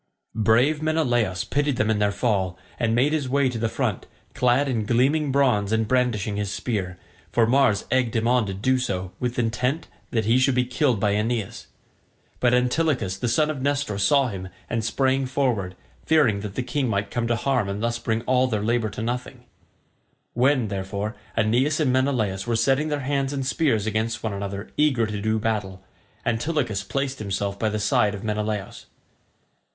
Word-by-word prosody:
Brave 115 +8 +3
Menelaus 120 - +1
pitied 145 -1 0
them 110 -3 +1
in 105 - 0
their 105 -1 +2
fall, 100 -4 0 0.2
and 115 -2 +1
made 135 +5 +3
his 145 -5 -1
way 140 0 +2
to 120 -2 -4
the 115 0 0
front, - - -2 0.3
clad 125 +3 +2
in 120 -5 0
gleaming 135 +6 +2
bronze 125 -7 +2
and 110 -1 +1
brandishing 115 -5 0
his 105 -2 -2
spear, 95 -7 -3 0.3
for 115 - +3
Mars 120 -4 +3
egged 125 -3 +1
him 115 0 +1
on 120 -3 +2
to 95 - -3
do 130 +6 +1
so 95 -6 -3
with 125 -1 -2
intent 125 +7 -1 0.2
that 110 -3 0
he 115 +4 +4
should 130 0 +3
be 125 0 +2
killed 125 -2 +1
by 100 0 +2
Aeneas; 110 0 -2 0.7
but 120 - +3
Antilochus 125 - +1
the 110 +5 -3
son 150 +6 +2
of 140 -4 -6
Nestor 140 -7 -1
saw 135 +6 +3
him 95 -3 -6 0.2
and 115 -1 -2
sprang 130 +3 +1
forward, 120 -9 -1 0.3
fearing 145 -11 +3
that 100 -1 -6
the 130 - -1
king 135 +1 -1
might 100 -3 -1
come 120 -1 -1
to 120 - +1
harm 125 -3 0
and 100 +3 -4
thus 120 0 -1
bring 115 0 -1
all 130 +1 +2
their 105 -4 -1
labour 115 0 +1
to 105 +2 -6
nothing; 125 +2 -4 0.9
when, 125 -2 +2
therefore 100 +3 -3 0.2
Aeneas 125 +8 +2
and 135 -5 +2
Menelaus 120 -7 0
were 120 - +1
setting 135 +6 +2
their 150 -1 -2
hands 140 0 -1
and 135 -2 -2
spears 130 -7 +1
against 110 +1 -2
one 110 -3 -2
another 100 0 -5
eager 140 -6 +3
to 105 -1 -4
do 110 +1 +1
battle, 105 -4 -2 0.4
Antilochus 120 -3 0
placed 135 +5 -3
himself 100 -1 -3
by 110 - +1
the 110 - -2
side 105 -1 +2
of 100 - -8
Menelaus. 105 -2 -3
115 Hz, 185 wpm, -24 LUFS, 105-130 Hz, 0.9 s, he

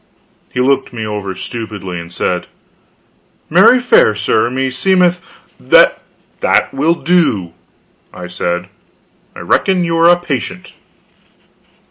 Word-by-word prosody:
He - - -4
looked 135 +2 +1
me 115 -3 -6
over 105 -3 -5
stupidly, 105 -7 -6
and 85 0 -10
said: 90 0 -2 1.0
"Marry, 190 +9 +6
fair 245 - +3
sir, 110 +2 0
me 130 +1 -2
seemeth 180 +5 +1 0.2
" - - -35 0.8
"That - - +1
will 155 +5 +1
do," 155 - 0 0.6
I 90 - -9
said; 90 0 -4 0.7
"I - - -9
reckon 185 -2 +1
you 165 -1 -1
are 165 +1 +5
a 175 - +5
patient." 140 -8 -5
125 Hz, 120 wpm, -14 LUFS, -, 1.0 s, Marry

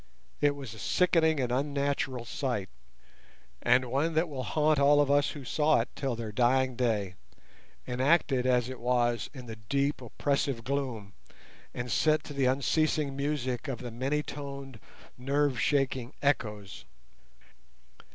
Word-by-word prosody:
It 145 -1 +3
was 135 -6 -8
a 110 - -11
sickening 160 - +2
and 125 -2 -1
unnatural 140 -2 -1
sight, 125 -6 -3 0.9
and 125 +1 +4
one 145 +6 0
that 160 +2 +2
will 140 -4 -5
haunt 150 +4 +2
all 145 +1 +5
who 145 0 +1
saw 150 +2 +3
it 115 - -2
till 135 -3 -2
their 115 -2 -5
dying 130 +3 +2
day—enacted 125 - -1
as 125 -2 +3
it 130 -1 -7
was 120 -1 +1
in 130 -4 -10
the 115 -1 -8
deep, 140 +7 -1
oppressive 135 0 -1
gloom, 125 -7 -3 0.6
and 120 0 -5
set 155 +3 +2
to 145 - -8
the 140 -2 +1
unceasing 140 +2 +1
music 140 -2 -2
of 135 -3 -3
the 120 0 -7
many 135 +6 -1
toned 140 -4 -7 0.4
nerve 140 0 +1
shaking 135 -3 0
echoes. 105 -8 -2
135 Hz, 135 wpm, -29 LUFS, 120-145 Hz, 0.9 s, all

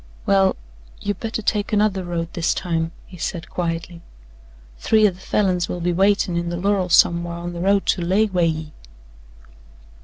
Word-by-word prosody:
"Well, 195 -1 +3 0.4
you 205 - -2
better 220 0 -5
take 205 +1 0
another 205 -3 +1
road 170 -1 -4
this 165 - 0
time," 165 -2 -2
he 180 - -13
said 165 0 -5
quietly. 170 0 -3 0.8
"Three 215 -1 +4
o' - - 0
the 180 - -15
Falins 185 -3 0
will 175 - -3
be 175 +1 0
waitin' 195 -1 +2
in 170 0 -1
the 175 - -3
lorrel 190 0 0
somewhar 170 0 +3
on 175 0 -5
the 170 - -5
road 195 +1 +2
to 185 - +1
lay 190 +5 +2
way 180 -5 +1
ye." 155 -1 -4
180 Hz, 175 wpm, -21 LUFS, 170-200 Hz, 0.8 s, Three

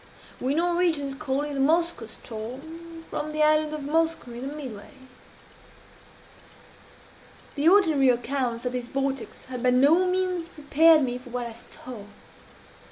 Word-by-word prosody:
"We 265 +3 0
Norwegians 340 -4 +1
call 275 -1 -2
it 295 0 -4
the 275 - -3
Moskoe 325 -3 +1
ström, 295 +10 -9
from 305 - -3
the 305 0 +1
island 305 0 +3
of 305 -1 -4
Moskoe 320 -3 0
in 245 +3 -6
the 290 - -6
midway." 250 -9 -8 2.6
The 295 +3 +3
ordinary 320 -9 +5
accounts 245 0 -1
of 250 - 0
this 250 -1 -4
vortex 275 +1 -3
had 255 -1 -6
by 255 - +3
no 290 +9 +4
means 365 -2 -1
prepared 310 0 +4
me 250 -1 -2
for 250 0 -13
what 245 0 -3
I 235 - -6
saw. 235 -1 -9
285 Hz, 145 wpm, -26 LUFS, 250-325 Hz, 2.6 s, ordinary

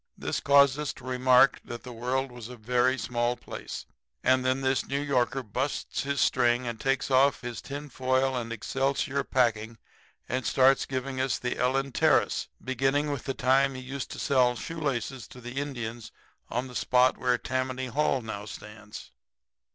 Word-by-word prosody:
This - - -2
caused 140 0 +5
us 150 - -2
to - - -15
remark 130 +1 +4
that 120 - -8
the 125 - -8
world 125 +3 -2
was 120 -2 -9
a 125 - -8
very 125 +3 +1
small 120 -1 -1
place, - - -8 0.4
and 130 0 +3
then 130 +1 +1
this 130 -1 0
New 140 - -1
Yorker 135 -2 0
busts 125 +6 -2
his 140 0 -2
string 120 +1 +3
and 120 -2 -4
takes 135 0 0
off 135 +2 +4
his 120 -3 -5
tin 145 +2 -6
foil 130 0 0
and 115 -2 -3
excelsior 135 +4 -1
packing 115 -3 0 0.5
and 130 +1 -2
starts 130 +3 +4
in - - -27
giving 130 0 -2
us 130 0 0
his 125 - -2
Ellen 135 +2 0
Terris, - - +2 0.2
beginning 135 +3 +1
with 140 - -4
the 135 - -2
time 135 +2 +3
he 130 - -6
used 135 +1 -5
to - - -7
sell 125 -3 +3
shoelaces 135 -4 -3
to 125 - -13
the 125 +2 -5
Indians 120 -5 -5 0.4
on 125 +3 -2
the 125 - -11
spot 125 +1 +3
where 125 -1 +2
Tammany 130 +1 -2
Hall 130 0 0
now 105 -2 -6
stands. 105 0 -10
130 Hz, 175 wpm, -28 LUFS, 120-135 Hz, 0.5 s, caused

